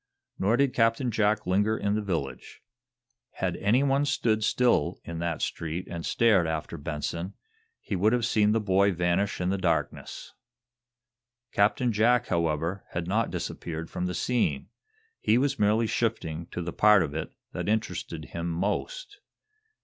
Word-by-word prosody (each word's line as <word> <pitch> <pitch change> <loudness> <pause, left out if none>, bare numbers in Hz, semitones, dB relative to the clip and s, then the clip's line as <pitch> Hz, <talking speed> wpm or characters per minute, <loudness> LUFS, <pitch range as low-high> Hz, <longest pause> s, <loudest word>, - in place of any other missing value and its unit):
Nor 105 +5 +2
did 140 -1 +2
Captain 115 +2 +2
Jack 110 0 +1
linger 105 +4 +2
in 100 0 0
the 110 - 0
village. 85 -9 -4 0.7
Had 90 -2 -2
anyone 135 +7 +2
stood 115 -6 +1
still 120 -9 +2
in 85 -1 -6
that 85 -1 -2
street 85 +3 -3
and 85 -1 -6
stared 105 -6 +3
after 80 -1 -3
Benson, 80 +5 -4 0.4
he 100 - -4
would 100 +4 +3
have 120 -2 +1
seen 105 -3 +3
the 115 - +2
boy 100 -1 +3
vanish 90 +3 0
in 90 +1 0
the 100 - -1
darkness. 85 -5 -2 1.2
Captain 110 +4 +2
Jack, 120 +3 +3
however, 85 +2 -1
had 85 0 -3
not 110 +4 +1
disappeared 80 -1 -5
from 90 - -2
the 90 - -3
scene. 85 - 0 0.5
He 110 - +3
was 140 +2 0
merely 105 +2 +3
shifting 85 -8 -2
to 90 - -5
the 85 - -5
part 105 -3 +5
of 70 - -4
it 80 +1 -5 0.2
that - - -3
interested 90 -7 -2
him 85 +1 -4
most. 105 - -3
100 Hz, 155 wpm, -27 LUFS, 85-115 Hz, 1.2 s, part